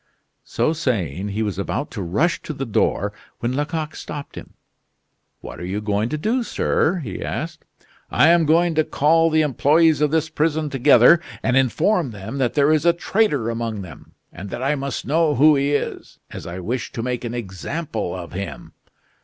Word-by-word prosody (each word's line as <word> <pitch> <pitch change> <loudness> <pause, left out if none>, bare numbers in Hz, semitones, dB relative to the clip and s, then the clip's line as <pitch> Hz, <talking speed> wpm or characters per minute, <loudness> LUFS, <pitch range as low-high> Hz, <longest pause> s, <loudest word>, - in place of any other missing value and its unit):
So 155 - 0
saying, 100 - -2
he 105 +2 -2
was 100 -3 -3
about 140 +8 -3
to 105 - -5
rush 145 - 0
to 155 - -6
the 135 -1 -4
door 105 -2 0 0.2
when 120 +1 -2
Lecoq 150 +2 -2
stopped 145 -1 -7
him. - - -11 0.9
"What - - -9
are - - -7
you 95 +4 -3
going 105 +1 -1
to 155 - -2
do, 225 +11 0
sir?" 185 -5 0
he 100 -7 -5
asked. - - -5 0.4
"I 160 - +4
am 170 -2 +4
going 170 +2 +3
to 155 0 +2
call 165 +3 +3
all - - +4
the 155 0 +3
employees 150 +2 +3
of 150 - +3
this 160 +1 +1
prison 155 -1 -1
together, 135 +4 +6 0.2
and 125 - +1
inform 140 - +2
them 110 +5 -7
that 125 -3 0
there 145 0 +4
is 155 -2 +2
a 170 - +6
traitor 170 - 0
among 115 -3 -3
them, 80 -6 -13 0.2
and 95 +4 -8
that 120 - -5
I 140 +3 +2
must 140 -2 -4
know 155 +2 +2
who 150 +4 +6
he 140 +1 +1
is, - - -4
as - - -8
I 85 +1 -6
wish 115 +7 -3
to 115 - -4
make 125 0 -3
an 120 0 -4
example 110 - -4
of 85 -2 -8
him. 100 +2 -6
140 Hz, 195 wpm, -21 LUFS, 110-155 Hz, 0.9 s, together